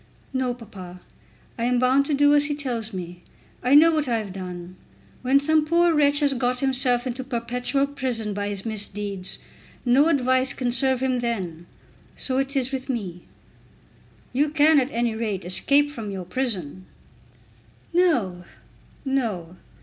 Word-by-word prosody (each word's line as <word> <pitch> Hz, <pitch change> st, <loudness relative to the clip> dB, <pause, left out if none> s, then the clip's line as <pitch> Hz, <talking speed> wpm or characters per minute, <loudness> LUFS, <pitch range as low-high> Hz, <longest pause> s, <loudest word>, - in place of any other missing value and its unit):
"No, 255 Hz, -2 st, -1 dB
papa. 185 Hz, -6 st, -11 dB, 0.6 s
I 230 Hz, -, 0 dB
am 250 Hz, 0 st, +2 dB
bound 260 Hz, +3 st, +3 dB
to 295 Hz, -, +1 dB
do 290 Hz, +1 st, +5 dB
as 290 Hz, 0 st, +4 dB
he 290 Hz, 0 st, -1 dB
tells 240 Hz, -6 st, -3 dB
me. 180 Hz, -2 st, -7 dB, 0.4 s
I 255 Hz, +3 st, +3 dB
know 325 Hz, +3 st, +8 dB
what 305 Hz, -3 st, 0 dB
I 235 Hz, -2 st, +1 dB
have 210 Hz, -4 st, -5 dB
done. 180 Hz, -1 st, -7 dB, 0.5 s
When 265 Hz, +2 st, +4 dB
some 310 Hz, +2 st, +3 dB
poor 340 Hz, +2 st, +3 dB
wretch 290 Hz, -1 st, +3 dB
has 285 Hz, -1 st, +3 dB
got 250 Hz, -1 st, 0 dB
himself 255 Hz, -2 st, +2 dB
into 255 Hz, +1 st, -4 dB
perpetual 250 Hz, +2 st, -1 dB
prison 255 Hz, -7 st, -3 dB
by 205 Hz, 0 st, -3 dB
his 200 Hz, 0 st, -5 dB
misdeeds, 205 Hz, -3 st, -2 dB, 0.5 s
no 265 Hz, +5 st, +5 dB
advice 260 Hz, -3 st, +2 dB
can 245 Hz, -2 st, -1 dB
serve 260 Hz, 0 st, +2 dB
him 255 Hz, -1 st, +1 dB
then. 185 Hz, -9 st, -4 dB, 0.5 s
So 260 Hz, 0 st, -1 dB
it 270 Hz, +1 st, -1 dB
is 265 Hz, -1 st, 0 dB
with 265 Hz, 0 st, -5 dB
me." 190 Hz, -9 st, -4 dB, 1.1 s
"You 290 Hz, +4 st, +2 dB
can 305 Hz, 0 st, +5 dB
at 260 Hz, 0 st, -1 dB
any 235 Hz, -3 st, -1 dB
rate 215 Hz, -5 st, -3 dB
escape 280 Hz, +11 st, +2 dB
from 225 Hz, -7 st, -6 dB
your 190 Hz, -2 st, -5 dB
prison." 185 Hz, -, -3 dB, 1.1 s
"No; 235 Hz, -, +1 dB, 0.6 s
no. 210 Hz, -11 st, -2 dB
250 Hz, 155 wpm, -24 LUFS, 205-275 Hz, 1.1 s, know